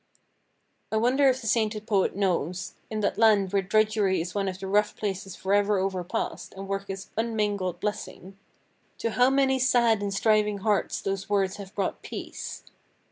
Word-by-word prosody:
I 220 Hz, -, +1 dB
wonder 260 Hz, +5 st, +4 dB
if 260 Hz, 0 st, 0 dB
the -, -, -9 dB
sainted 215 Hz, -1 st, 0 dB
poet 200 Hz, -5 st, +1 dB
knows—in 185 Hz, +3 st, -2 dB
that 200 Hz, -, 0 dB
land 205 Hz, -4 st, +4 dB
where 200 Hz, -, +3 dB
drudgery 210 Hz, 0 st, +2 dB
is 175 Hz, +2 st, -4 dB
one 200 Hz, -1 st, -1 dB
of 185 Hz, -1 st, -3 dB
the 195 Hz, -, -6 dB
rough 205 Hz, +2 st, +2 dB
places 195 Hz, -2 st, -4 dB
forever 205 Hz, +1 st, +2 dB
overpast, 190 Hz, -1 st, -3 dB
and 195 Hz, 0 st, -6 dB
work 195 Hz, 0 st, -3 dB
is 195 Hz, 0 st, -6 dB
unmingled 210 Hz, -5 st, -1 dB
blessing—to 200 Hz, +2 st, -7 dB
how 250 Hz, +3 st, +4 dB
many 270 Hz, -1 st, +2 dB
sad 235 Hz, -4 st, +3 dB
and 200 Hz, -1 st, -2 dB
striving 210 Hz, 0 st, +2 dB
hearts 205 Hz, 0 st, 0 dB
those 195 Hz, 0 st, -3 dB
words 195 Hz, -2 st, +1 dB
have 200 Hz, 0 st, -10 dB
brought 195 Hz, -, -2 dB
peace? -, -, -7 dB
205 Hz, 160 wpm, -27 LUFS, 195-220 Hz, -, wonder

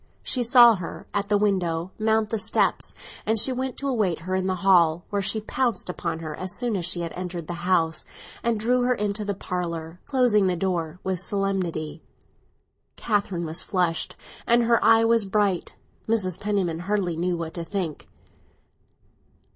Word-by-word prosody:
She 255 Hz, -, +1 dB
saw 240 Hz, -2 st, +7 dB
her—at 200 Hz, +3 st, -5 dB
the 205 Hz, -, +4 dB
window—mount 200 Hz, +3 st, 0 dB
the 225 Hz, -, -1 dB
steps, -, -, +1 dB, 0.3 s
and 220 Hz, 0 st, +2 dB
she 260 Hz, -, +5 dB
went 260 Hz, 0 st, -3 dB
to 280 Hz, -, -3 dB
await 210 Hz, -11 st, 0 dB
her 185 Hz, +3 st, -4 dB
in 185 Hz, 0 st, 0 dB
the 185 Hz, -, 0 dB
hall, 170 Hz, -3 st, +4 dB
where 200 Hz, -1 st, 0 dB
she 220 Hz, +3 st, +1 dB
pounced 235 Hz, -3 st, -1 dB
upon 165 Hz, -2 st, -4 dB
her 155 Hz, -2 st, -5 dB
as 185 Hz, -1 st, -2 dB
soon 240 Hz, -3 st, -1 dB
as 180 Hz, -3 st, -1 dB
she 180 Hz, -1 st, -1 dB
had 165 Hz, -1 st, -4 dB
entered 180 Hz, -2 st, -5 dB
the 175 Hz, +2 st, -5 dB
house, 165 Hz, -3 st, +2 dB, 0.4 s
and 230 Hz, -2 st, 0 dB
drew 245 Hz, +3 st, +2 dB
her 250 Hz, 0 st, +2 dB
into 210 Hz, -1 st, -2 dB
the 200 Hz, -1 st, -2 dB
parlour, 170 Hz, -2 st, -4 dB
closing 245 Hz, -7 st, +3 dB
the 180 Hz, -, +1 dB
door 175 Hz, -2 st, -2 dB
with 190 Hz, -2 st, -1 dB
solemnity. 180 Hz, -5 st, -2 dB, 0.9 s
Catherine 200 Hz, -6 st, -1 dB
was 160 Hz, +2 st, -3 dB
flushed, 180 Hz, -4 st, -1 dB, 0.3 s
and 235 Hz, 0 st, +4 dB
her 235 Hz, 0 st, +3 dB
eye 225 Hz, 0 st, +6 dB
was 230 Hz, -3 st, +3 dB
bright. 195 Hz, -2 st, 0 dB, 0.3 s
Mrs. 190 Hz, -5 st, +1 dB
Penniman 195 Hz, -6 st, -1 dB
hardly 185 Hz, -2 st, -1 dB
knew 175 Hz, +1 st, -1 dB
what 165 Hz, -1 st, -5 dB
to 170 Hz, -, -4 dB
think. 170 Hz, -3 st, -4 dB
190 Hz, 170 wpm, -25 LUFS, 170-220 Hz, 0.9 s, saw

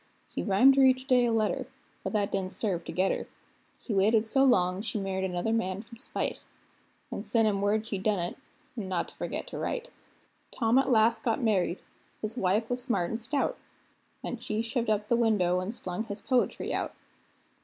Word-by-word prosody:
He -, -, -4 dB
rhymed 250 Hz, +7 st, +5 dB
her -, -, +6 dB
each 260 Hz, 0 st, +4 dB
day 250 Hz, -3 st, +5 dB
a 235 Hz, -, +1 dB
letter, 220 Hz, -1 st, 0 dB, 0.4 s
but -, -, -2 dB
that 205 Hz, -2 st, +1 dB
didn't 190 Hz, -1 st, -2 dB
serve 185 Hz, -6 st, -1 dB
to -, -, -5 dB
get 190 Hz, +1 st, +2 dB
her; -, -, -3 dB, 0.5 s
He 230 Hz, -, -5 dB
waited 215 Hz, +3 st, +3 dB
so 270 Hz, +5 st, +3 dB
long, 185 Hz, -7 st, +3 dB
she 220 Hz, -1 st, -2 dB
married 190 Hz, -1 st, -2 dB
another 180 Hz, +4 st, -1 dB
man 195 Hz, -3 st, -1 dB
from 235 Hz, +1 st, -14 dB
spite, 270 Hz, -, -3 dB, 0.6 s
An' -, -, -3 dB
sent 225 Hz, -2 st, +2 dB
him 200 Hz, -2 st, 0 dB
word 210 Hz, +2 st, +1 dB
she'd 200 Hz, -4 st, -3 dB
done 210 Hz, 0 st, +2 dB
it, 175 Hz, 0 st, -2 dB, 0.4 s
an' 205 Hz, -6 st, -5 dB
not 180 Hz, -2 st, -1 dB
to -, -, -16 dB
forget -, -, -4 dB
to -, -, -6 dB
write. -, -, -3 dB, 0.6 s
Tom 230 Hz, +2 st, +2 dB
at 270 Hz, -, +1 dB
last 225 Hz, -1 st, +4 dB
got 230 Hz, +1 st, 0 dB
married; 195 Hz, -5 st, +1 dB, 0.4 s
his 215 Hz, +1 st, -4 dB
wife 210 Hz, 0 st, +1 dB
was 245 Hz, +1 st, -1 dB
smart 200 Hz, -9 st, 0 dB
and 225 Hz, -, -1 dB
stout, 285 Hz, -, -1 dB, 0.6 s
An' 245 Hz, -, -4 dB
she 220 Hz, -1 st, -2 dB
shoved 230 Hz, 0 st, -1 dB
up 210 Hz, -1 st, +1 dB
the 235 Hz, -, +3 dB
window 205 Hz, -7 st, +2 dB
and 185 Hz, +3 st, -3 dB
slung 205 Hz, -3 st, -3 dB
his 205 Hz, -1 st, -5 dB
poetry 250 Hz, +3 st, 0 dB
out. -, -, -2 dB
220 Hz, 200 wpm, -29 LUFS, 195-235 Hz, 0.6 s, her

